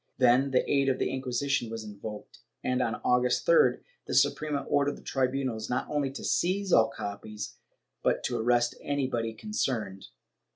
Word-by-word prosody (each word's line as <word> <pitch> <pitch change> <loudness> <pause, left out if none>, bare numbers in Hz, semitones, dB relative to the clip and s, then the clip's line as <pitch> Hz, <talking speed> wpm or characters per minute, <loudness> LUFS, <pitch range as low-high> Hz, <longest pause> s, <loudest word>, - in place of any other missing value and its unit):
Then 130 +2 +4
the 130 -1 +1
aid 140 -1 +2
of 130 - +1
the - - -1
Inquisition 130 -1 -1
was 115 -1 -5
invoked 105 0 -9 0.2
and, 125 0 +1
on 115 - 0
August 125 0 +2
3d, - - +4 0.3
the - - -2
Suprema 150 -2 +2
ordered 145 0 +1
the - - -15
tribunals 130 -4 -1
not 125 - -1
only 145 -2 0
to - - -7
seize 190 +1 +1
all 110 0 +6
copies 105 -1 -6 0.4
but - - +1
to - - -1
arrest 120 +1 +2
everybody 130 -5 -1
concerned. 115 - -3
125 Hz, 160 wpm, -29 LUFS, 115-140 Hz, 0.4 s, all